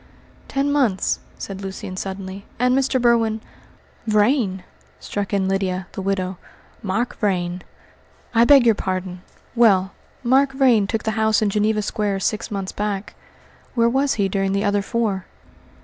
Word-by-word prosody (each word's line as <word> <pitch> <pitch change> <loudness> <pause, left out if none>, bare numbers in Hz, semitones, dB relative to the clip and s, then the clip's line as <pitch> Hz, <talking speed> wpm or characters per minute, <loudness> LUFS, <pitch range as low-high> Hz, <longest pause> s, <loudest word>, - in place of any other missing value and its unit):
"Ten 280 +1 0
months," 250 -10 +1 0.2
said 195 -1 -7
Lucian 190 -1 -6
suddenly, 190 +1 -6
"and 250 +1 +2
Mr. 270 -1 +1
Berwin 230 -2 +2 0.4
" - - -31
"Vrain!" 210 -3 +2 0.4
struck 205 -1 -4
in 195 -2 +1
Lydia, 190 -1 -1
the - - -6
widow, 190 -1 -2 0.4
"Mark 220 +5 -2
Vrain." 180 -4 -1 0.7
"I 230 0 +5
beg 275 0 +7
your 230 - +6
pardon! 185 -2 -4 0.3
Well, 195 -5 +4 0.3
Mark 270 +3 +3
Vrain 250 -7 +4
took 220 +1 -2
the 220 - 0
house 220 0 +3
in 205 - +1
Geneva 210 +1 +1
Square 205 -2 -1
six 215 +2 -1
months 195 -2 -4
back. 205 -1 -3 0.6
Where 235 -1 +4
was 270 +3 +1
he 200 -2 +1
during 195 0 0
the 200 +1 0
other 205 0 +2
four?" 205 -3 -2
205 Hz, 150 wpm, -21 LUFS, 195-235 Hz, 0.7 s, beg